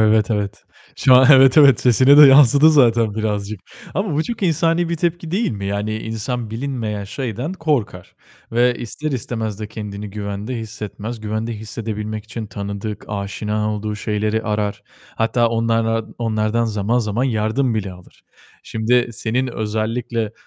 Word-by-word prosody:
Evet, 110 -1 +3
evet. 105 -1 -3 0.3
Şu 130 - +5
an 130 +1 +7
evet, 135 +2 +6
evet, 140 -6 +6
sesine 130 +3 +5
de 150 - +10
yansıdı 140 +3 +7
zaten 115 -7 +3
birazcık. 105 -2 -3 0.3
Ama 195 -6 -1
bu 155 - +1
çok 235 +2 -5
insani 165 0 +1
bir 170 - -1
tepki 170 -1 -2
değil 210 +6 0
mi? 100 -3 -5
Yani, 105 +2 -2
insan 115 +1 -4
bilinmeyen 115 -4 -4
şeyden 125 - -4
korkar 135 - -2 0.4
ve 120 +1 +3
ister 145 +7 -5
istemez 110 -4 -4
de 105 - -4
kendini 105 -2 -7
güvende 105 +4 -5
hissetmez. 110 0 -6
Güvende 110 +2 -3
hissedebilmek 110 0 -5
için 110 0 -7
tanıdık, 100 +1 -6
aşina 105 +1 -3
olduğu 105 0 -4
şeyleri 105 +1 -1
arar. 105 -1 -2 0.3
Hatta 115 +1 +2
onlarla 115 -1 0
onlardan 110 0 0
zaman 110 +2 0
zaman 115 +1 -1
yardım 115 +1 0
bile 100 -3 -3
alır. 90 -1 -17 0.4
Şimdi 120 +2 +1
senin 120 +4 -1
özellikle 110 0 -3
110 Hz, 145 wpm, -19 LUFS, 105-125 Hz, 0.4 s, de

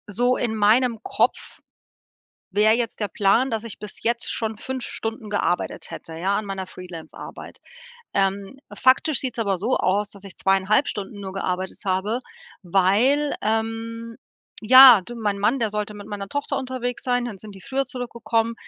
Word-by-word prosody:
So 245 +5 +1
in 225 -2 -1
meinem 225 +3 +3
Kopf - - -1 0.9
wäre 210 +3 +4
jetzt 230 -1 -2
der 210 - -1
Plan, 210 +8 +2
dass 225 -1 -2
ich 230 - -8
bis 210 -1 -10
jetzt 235 +1 0
schon 220 -1 -2
5 260 +1 -5
Stunden 225 -1 -5
gearbeitet 190 -3 -1
hätte, 165 - -8
ja, 190 +5 0
an 215 - -2
meiner 195 -1 -5
Freelance-Arbeit. 180 -3 -10 0.5
Ähm, 195 +5 -1 0.2
faktisch 265 +2 +3
sieht's 255 -3 -4
aber 200 -4 +1
so 220 +8 0
aus, 200 +3 +1
dass 200 -1 -12
ich 195 - -11
2,5 195 +7 +2
Stunden 205 0 -5
nur 190 -1 -6
gearbeitet 185 -1 -3
habe, 195 +6 0 0.4
weil, 205 +11 +3
ähm 225 +1 -2 0.5
ja, 255 -1 +10
de 240 +6 -10
mein 205 -3 -2
Mann, 230 +6 +2
der 225 -3 0
sollte 210 0 -3
mit 205 -1 -10
meiner 205 -2 -6
Tochter 285 +6 -2
unterwegs 255 -2 -3
sein, 245 -1 0
dann 235 -4 -5
sind 210 +2 -10
die 195 - -13
früher 275 +5 -1
zurückgekommen. 235 -3 -2
215 Hz, 165 wpm, -23 LUFS, 195-240 Hz, 0.9 s, ja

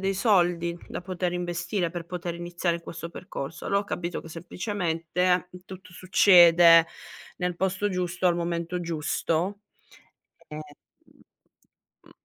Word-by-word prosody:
dei 195 0 0
soldi 175 -5 +2
da - - -5
poter 180 -1 -3
investire, 175 +1 -2
per 170 -1 -6
poter 175 -1 -5
iniziare 175 0 -2
questo 170 0 -8
percorso. 165 -3 -7
Allora 200 0 +2
ho - - -7
capito 175 -3 -4
che 165 - -12
semplicemente 180 0 -1 0.2
tutto 185 -1 -11
succede 175 -3 +6 0.5
nel 180 -1 -2
posto 190 +2 0
giusto 180 0 -1
al 175 - +4
momento 170 +1 -2
giusto. 170 +4 -2 0.9
E, 150 - -8
mhmm, 150 -1 -18
175 Hz, 120 wpm, -26 LUFS, 170-185 Hz, 0.9 s, succede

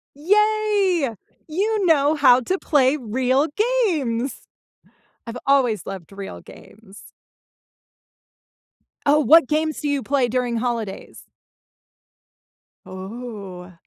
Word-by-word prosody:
Yay! 400 - +1 0.3
You 400 +5 -1
know 295 -2 +3
how 270 -4 +5
to 370 +9 -2
play 285 -1 +2
real 260 +3 0 0.5
games. 255 -3 -3 0.8
I've 230 +2 -6
always 250 - +2
loved 195 -2 -8
real 195 - -8
games. 205 -1 -16 2.0
Oh, 290 +1 +4
what 310 -1 +5
games 310 0 -1
do 295 - -2
you 285 -2 0
play 270 -2 0
during 245 0 -1
holidays? 230 -4 -5 1.6
Ooh. 190 -2 -9
260 Hz, 95 wpm, -21 LUFS, 225-310 Hz, 2.0 s, how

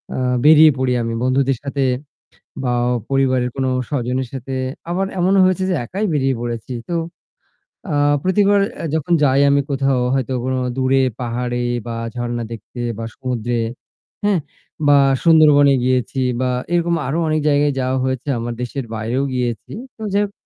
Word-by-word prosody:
আ - - -3 0.3
বেরিয়ে 155 0 +8
পড়ি 130 -1 +1
আমি 115 0 -2
বন্ধুদের 130 0 +1
সাথে 140 -1 -2 0.8
বা 125 - 0 0.4
পরিবারের 130 -2 +1
কোন 135 -1 -1 0.2
স্বজনের 130 -2 -1
সাথে 135 0 -6 0.4
আবার 185 +3 0
এমনও 190 +2 +3
হয়েছে 185 0 +1
যে - - +1
একাই 195 - -3
বেরিয়ে 135 -2 +1
পড়েছি। 120 +1 -4 0.2
তো 175 - -1 1.0
আ - - -1 0.3
প্রতিবার 200 +2 +3 0.2
এ্যা - - -5
যখন 160 +2 0
যাই 135 0 +4
আমি 140 0 +3
কোথাও 135 -1 +1
হয়তো 135 -1 -1
কোন 130 - -1 0.2
দূরে 135 0 +2 0.2
পাহাড়ে 120 0 -2 0.3
বা 115 - -4 0.2
ঝরণা 120 -1 -3
দেখতে 115 +2 -8 0.2
বা 115 - -4
সমুদ্রে, 120 -2 -2 0.6
হ্যাঁ? 205 -3 +2 0.5
বা 145 0 +6 0.3
সুন্দরবনে 150 -4 +6
গিয়েছি 130 +1 0 0.2
বা 130 - +1 0.2
এরকম 170 0 +2
আরো 145 +5 -1
অনেক 155 0 +1
জায়গায় 145 0 +2
যাওয়া 130 0 0
হয়েছে 130 +1 -3
আমার 120 +1 -3
দেশের 125 +2 -4
বাইরেও 115 +5 -1
গিয়েছি। 120 -2 -3 0.2
তো - - -14
যাই 205 +1 +3
হোক 200 - -10
135 Hz, 155 wpm, -19 LUFS, 125-150 Hz, 1.0 s, বেরিয়ে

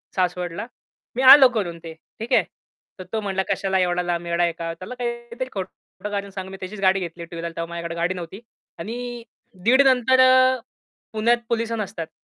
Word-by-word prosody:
सासवडला, 180 0 -2 0.5
मी 255 - -1
आलो 265 +1 +10
करून 175 -5 -2
ते." 165 -1 -8 0.3
ठीक 225 - -3
आहे. - - +5 0.6
तर 185 - -6
तो 220 - +1
म्हणला, 195 -1 -1
"कशाला 190 -1 0
एवढा 180 -1 +1
लांब 175 -1 -2
येडा 170 +1 +1
आहे 170 - +2
का?" 165 0 -5
त्याला 185 +9 -9
काहीतरी 235 +1 -5
खोटं 195 +1 -7
कारण 200 -1 -3
सांगून 190 -1 -7
मी 195 - -8
त्याचीच 195 +2 -7
गाडी 190 0 +4
घेतली 170 -1 -6
टू 170 - -11
व्हीलर 170 0 -4
तेव्हा 165 0 -4
माझ्याकडे 170 0 -5
गाडी 170 +2 0
नव्हती. 180 +2 -8 0.4
आणि 240 +4 -6 0.4
दीड 255 +6 +5
नंतर 260 0 +4
अ, 255 0 +6 0.5
पुण्यात 230 +2 +3
पोलिस 230 -1 -1
नसतात 195 -7 -4
195 Hz, 185 wpm, -23 LUFS, 175-235 Hz, 0.6 s, आलो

